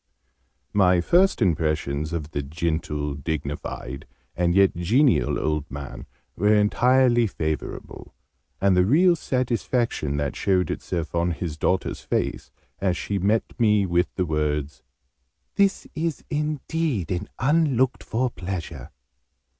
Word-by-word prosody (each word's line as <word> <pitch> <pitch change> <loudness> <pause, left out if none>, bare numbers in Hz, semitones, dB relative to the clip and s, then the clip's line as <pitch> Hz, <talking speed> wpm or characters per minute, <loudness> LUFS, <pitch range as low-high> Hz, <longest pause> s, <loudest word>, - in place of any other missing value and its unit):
My 90 -3 +4
first 180 - +3
impressions 75 -4 0
of 80 -2 -4
the 70 - -2
gentle, 75 -1 -2
dignified, 70 -2 -5 0.3
and 85 0 +1
yet 100 -1 +4
genial 105 - +2
old 75 -1 -1
man 70 +1 -8 0.3
were 105 +3 +3
entirely 120 +3 +4
favourable: 80 -5 -5 0.4
and 100 -1 +3
the 90 - +5
real 170 - +4
satisfaction 120 - -1
that 70 -1 -2
showed 95 -2 +1
itself 85 -2 -4
on 85 0 +1
his 80 -2 -4
daughter's 90 +4 -1
face, - - -2 0.3
as 95 -2 0
she 100 -1 -2
met 105 +4 +2 0.2
me 105 -3 +4
with 90 0 +1
the 90 - 0
words 75 -2 -2 0.7
"this 200 -1 +2
is 160 -1 -3
indeed 150 - -1
an 90 +3 -3
unlooked 135 -2 +2
for 125 +2 -1
pleasure!" 85 - -6
90 Hz, 120 wpm, -24 LUFS, 75-120 Hz, 0.7 s, the